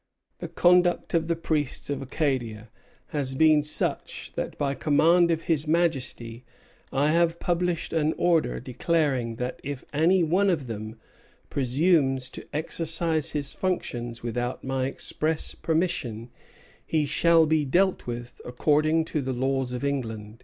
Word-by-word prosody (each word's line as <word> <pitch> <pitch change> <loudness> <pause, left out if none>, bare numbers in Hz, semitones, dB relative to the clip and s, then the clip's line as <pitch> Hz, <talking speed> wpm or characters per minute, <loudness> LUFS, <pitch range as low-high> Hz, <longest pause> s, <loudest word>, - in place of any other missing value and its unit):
The - - -5
conduct 175 0 +3
of 165 -1 +1
the 170 - +1
priests 155 -4 -2
of 140 -1 -3
Acadia 125 -6 -2 0.4
has 135 -3 -2
been 155 +1 +5
such 150 +1 -3
that - - -4
by 140 -1 0
command 165 +5 +3
of 165 -1 0
his 155 -2 0
Majesty 130 -8 -1 0.5
I 145 +3 +2
have 170 0 +2
published 175 -2 -1
an 160 -1 +1
Order 170 -3 +2
declaring 130 -2 -1
that 125 +2 -4
if 140 -2 -6
any 170 +5 +3
one 185 +5 +2
of 160 -7 0
them 110 -1 -7 0.5
presumes 135 -1 +2
to - - -8
exercise 160 0 0
his 145 -1 -1
functions 120 -11 -3
without 120 +1 -3
my 130 0 -1
express 155 +3 -2
permission 150 -9 -2 0.5
he 155 -2 0
shall 165 +3 +4
be 155 -1 +2
dealt 180 +6 +1
with 120 0 -6
according 155 +5 +1
to 155 -2 -2
the 130 -1 -3
laws 130 0 -1
of 125 +2 -4
England." 115 -6 -3
150 Hz, 140 wpm, -26 LUFS, 125-165 Hz, 0.5 s, been